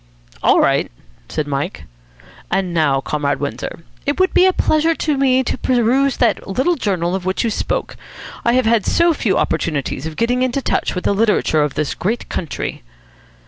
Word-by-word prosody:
"All -, -, +4 dB
right," -, -, +2 dB, 0.4 s
said 155 Hz, -, -2 dB
Mike. 140 Hz, 0 st, -3 dB, 0.7 s
"And 190 Hz, -2 st, -1 dB
now, 145 Hz, -5 st, +2 dB
Comrade 145 Hz, 0 st, -1 dB
Windsor, 145 Hz, +3 st, -5 dB, 0.2 s
it 285 Hz, +4 st, -1 dB
would 375 Hz, 0 st, +2 dB
be 370 Hz, -, +5 dB
a -, -, +5 dB
pleasure 320 Hz, -2 st, +2 dB
to 305 Hz, -2 st, 0 dB
me 260 Hz, -1 st, +3 dB
to 255 Hz, -, -3 dB
peruse 255 Hz, +2 st, +2 dB
that 230 Hz, -4 st, +1 dB
little 260 Hz, -, +1 dB
journal 185 Hz, -, -1 dB
of 190 Hz, -1 st, -2 dB
which 185 Hz, +1 st, -1 dB
you 230 Hz, -, 0 dB
spoke. -, -, -2 dB, 0.5 s
I 235 Hz, -, +2 dB
have 255 Hz, -1 st, +2 dB
had 225 Hz, -2 st, +3 dB
so 340 Hz, 0 st, +3 dB
few 210 Hz, -10 st, 0 dB
opportunities 155 Hz, -2 st, -1 dB
of 160 Hz, -, -7 dB
getting 245 Hz, +2 st, +1 dB
into 255 Hz, +1 st, +1 dB
touch 270 Hz, -, -1 dB
with 180 Hz, -, -3 dB
the -, -, +2 dB
literature 205 Hz, -7 st, +2 dB
of 150 Hz, -2 st, -1 dB
this 150 Hz, -2 st, -1 dB
great 225 Hz, +6 st, -3 dB
country." 165 Hz, -, -4 dB
220 Hz, 185 wpm, -18 LUFS, 165-260 Hz, 0.7 s, be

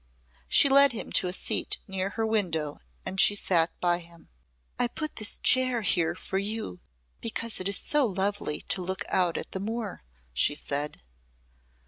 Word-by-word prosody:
She -, -, +6 dB
led 280 Hz, -1 st, +6 dB
him 225 Hz, -, -6 dB
to 185 Hz, -, +3 dB
a -, -, -2 dB
seat 185 Hz, -, 0 dB
near 190 Hz, 0 st, -2 dB
her 225 Hz, -, +1 dB
window 170 Hz, -9 st, -1 dB, 0.3 s
and 190 Hz, +2 st, +2 dB
she 205 Hz, -, +6 dB
sat 170 Hz, -4 st, +2 dB
by 175 Hz, -1 st, +1 dB
him. 170 Hz, -1 st, -17 dB, 0.5 s
"I 245 Hz, -, +3 dB
put 310 Hz, +5 st, -6 dB
this 215 Hz, -2 st, -1 dB
chair 255 Hz, -3 st, +4 dB
here 170 Hz, -5 st, +1 dB
for 190 Hz, -, -3 dB
you 200 Hz, -, -4 dB, 0.4 s
because 230 Hz, 0 st, -2 dB
it 185 Hz, +1 st, -2 dB
is 200 Hz, -, 0 dB
so 295 Hz, -4 st, +1 dB
lovely 195 Hz, -5 st, -2 dB
to 185 Hz, -, 0 dB
look 190 Hz, +1 st, -3 dB
out 180 Hz, -3 st, +1 dB
at -, -, -6 dB
the 190 Hz, -, -4 dB
moor," 220 Hz, 0 st, -4 dB, 0.3 s
she 65 Hz, -, +2 dB
said. 145 Hz, -, -3 dB
195 Hz, 170 wpm, -28 LUFS, 175-225 Hz, 0.5 s, She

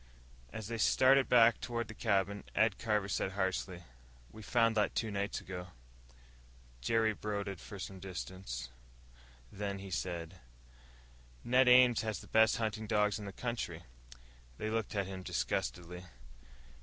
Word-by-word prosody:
As 110 Hz, -, -6 dB
they 115 Hz, 0 st, -4 dB
started 130 Hz, +4 st, +5 dB
back 115 Hz, -2 st, +6 dB
toward 115 Hz, -1 st, -3 dB
the 110 Hz, -, -8 dB
cabin, 100 Hz, -1 st, 0 dB
Ed 110 Hz, -3 st, +3 dB
Carver 105 Hz, -3 st, 0 dB
said 95 Hz, -1 st, -1 dB
harshly, 95 Hz, -2 st, -2 dB, 0.5 s
"We 110 Hz, -, -11 dB
found 115 Hz, 0 st, +2 dB
that 105 Hz, -2 st, +1 dB
two 110 Hz, -2 st, -1 dB
nights 100 Hz, 0 st, -2 dB
ago." 90 Hz, -1 st, -7 dB, 1.1 s
Jerry 110 Hz, -, +2 dB
brooded 100 Hz, -3 st, -4 dB
for 105 Hz, -, -9 dB
some 95 Hz, 0 st, -7 dB
distance, 90 Hz, -9 st, -6 dB, 0.8 s
then 100 Hz, 0 st, -3 dB
he 95 Hz, 0 st, -9 dB
said, 85 Hz, 0 st, -4 dB, 1.0 s
"Ned 125 Hz, +1 st, +4 dB
Ames 125 Hz, -2 st, +7 dB
has 110 Hz, -1 st, -3 dB
the -, -, -12 dB
best 110 Hz, 0 st, +4 dB
hunting 110 Hz, -1 st, -2 dB
dogs 105 Hz, -1 st, +2 dB
in 105 Hz, -, -7 dB
the 100 Hz, -, -5 dB
country." 95 Hz, -7 st, -4 dB, 0.7 s
They 110 Hz, -, -3 dB
looked 110 Hz, -2 st, -2 dB
at 100 Hz, -1 st, 0 dB
him 95 Hz, 0 st, -6 dB
disgustedly. 90 Hz, -1 st, -3 dB
105 Hz, 145 wpm, -33 LUFS, 95-115 Hz, 1.1 s, Ames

